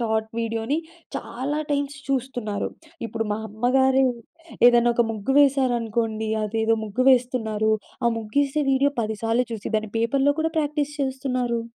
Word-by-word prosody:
Short 220 -1 0
వీడియోని 230 +6 -1 0.4
చాలా 285 +5 -3
times 285 0 -1
చూస్తున్నారు. 245 -6 -2 0.4
ఇప్పుడు 225 +1 -3
మా 210 - -2
అమ్మగారు 260 +4 +3 0.6
ఏదైనా 240 0 +5
ఒక 240 - +4
ముగ్గు 215 +4 -2
వేసారనుకోండి 235 -5 +1 0.2
అదేదో 225 +1 +1
ముగ్గు 215 +5 -1
వేస్తున్నారు 225 -4 +1 0.3
ఆ - - +4
ముగ్గేసే 280 +7 0
వీడియో 280 +2 +3
10 215 0 -3
సార్లు 230 +2 +2
చూసి 220 0 -5
దాన్ని 215 -1 -3
పేపర్లో 270 +5 +2
కూడా 320 +1 +1
ప్రాక్టీస్ 295 -1 -1
చేస్తున్నారు. 255 -3 -1
245 Hz, 135 wpm, -24 LUFS, 220-270 Hz, 0.6 s, ఏదైనా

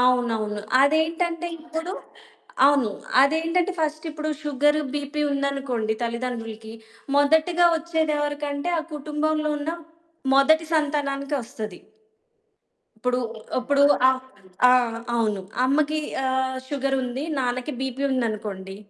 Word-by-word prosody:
అవునవును. 230 -4 +1 0.2
అదేంటంటే 330 +4 +2
ఇప్పుడు 325 +2 -5 0.7
అవును. 275 -6 +3 0.3
అదేంటంటే, 330 +5 +2
ఫస్టిప్పుడు 310 0 -2
షుగర్, 295 +1 +2 0.2
బీపీ 290 +1 -3
ఉందనుకోండి 275 -6 -1
తల్లిదండ్రులుకి, 230 -2 -4 0.4
మొదటగా 320 +4 +4
ఒచ్చేదెవరకంటే, 295 -1 -1
ఆ - - +1
కుటుంబంలో 305 +1 -1
ఉన్న 290 +2 -3 0.6
మొదటి 315 +4 +5
సంతానానికే 285 -2 0
ఒస్తది. 220 -6 -7 1.2
ఇప్పుడు, 250 +2 0 0.4
అప్పుడు 280 +3 +2 0.3
ఆ! - - +7 0.6
ఆ! - - +7 0.4
అవును. 215 -4 0 0.2
అమ్మకీ 300 +3 +2 0.3
ఆహ్, 260 0 0
షుగరుంది, 270 -1 -1
నాన్నకి 255 +2 -1
బీపీ 265 0 -3
ఉందనుకోండి, 210 -5 -3
280 Hz, 90 wpm, -24 LUFS, 250-310 Hz, 1.2 s, ఆ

